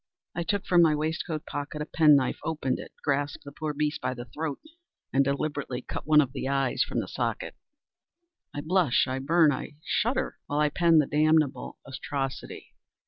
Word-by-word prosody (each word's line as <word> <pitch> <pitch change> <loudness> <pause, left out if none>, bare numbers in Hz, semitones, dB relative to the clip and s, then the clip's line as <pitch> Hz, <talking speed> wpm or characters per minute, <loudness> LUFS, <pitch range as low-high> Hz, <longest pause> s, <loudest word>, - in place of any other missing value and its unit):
I 175 - -1
took 200 +4 -1
from 175 -1 +5
my 160 -2 +5
waistcoat 155 +1 -3
pocket 145 +1 -5
a 150 - -2
pen 155 -2 +5
knife, 135 -2 +1
opened 150 -5 -1
it, - - -9
grasped 145 +1 -1
the 140 - -9
poor 155 +1 -4
beast 150 +1 -2
by 130 - -2
the 120 0 -7
throat, 150 +4 -4 0.5
and 135 +1 +4
deliberately 140 -2 -2
cut - - -6
one 155 -1 +7
of 135 -3 -2
its - - -3
eyes 135 -2 +1
from - - 0
the - - -6
socket! - - -3 1.0
I 145 - -5
blush, 165 -5 +2
I 130 +1 -2
burn, 155 +3 +4
I 145 +2 -5
shudder, 245 +4 0
while 145 - -1
I 150 0 +3
pen 170 +1 +4
the 150 - +5
damnable 155 0 +1
atrocity. 135 0 -5
150 Hz, 185 wpm, -27 LUFS, 140-160 Hz, 1.0 s, one